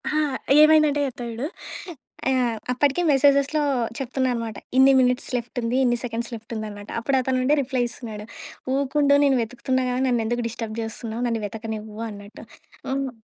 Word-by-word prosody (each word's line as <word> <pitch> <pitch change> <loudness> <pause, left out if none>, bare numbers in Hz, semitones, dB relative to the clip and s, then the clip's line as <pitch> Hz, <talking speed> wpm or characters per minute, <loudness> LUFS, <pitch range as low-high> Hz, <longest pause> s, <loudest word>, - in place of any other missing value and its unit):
ఆ! - - -2 0.5
ఏమైందంటే 305 -2 +5
చెప్తా 250 -2 -7
చూడు. 235 +5 -3 0.8
ఆహ్, 245 -3 +1
అప్పటికే 280 +5 +2
మెసేజెస్‌లో 280 +2 +4 0.4
చెప్తున్నా 260 0 -1
అనమాట. 230 -3 -4 0.2
ఇన్ని 265 +1 +7
మినిట్స్ 250 0 +1
లెఫ్ట్ 240 +1 -7
ఉంది. 235 +2 0
ఇన్ని 240 -1 +2
సెకండ్స్ 235 0 -4
లెఫ్ట్ 225 +1 -9
ఉందనమాట. 210 -2 -6
అప్పుడతనుండి 260 +2 +1
రిప్లై 260 -1 -1
ఇస్తున్నాడు. 220 -3 -7 0.5
"ఊకుండు 280 +1 +2
నేను 275 -2 +4
వెతుకుతున్నా 255 +3 -1
కదా! 250 0 -1
నన్ను 240 -2 +2
ఎందుకు 240 +2 -1
డిస్టర్బ్ 225 -1 -5
చేస్తున్నావు, 225 +1 -5
నన్ను 230 -2 -1
వెతకనివ్వు" 215 0 -6
అన్నట్టు. 205 0 -11 0.5
హ్మ్. 270 0 -1
245 Hz, 145 wpm, -24 LUFS, 225-270 Hz, 0.8 s, ఇన్ని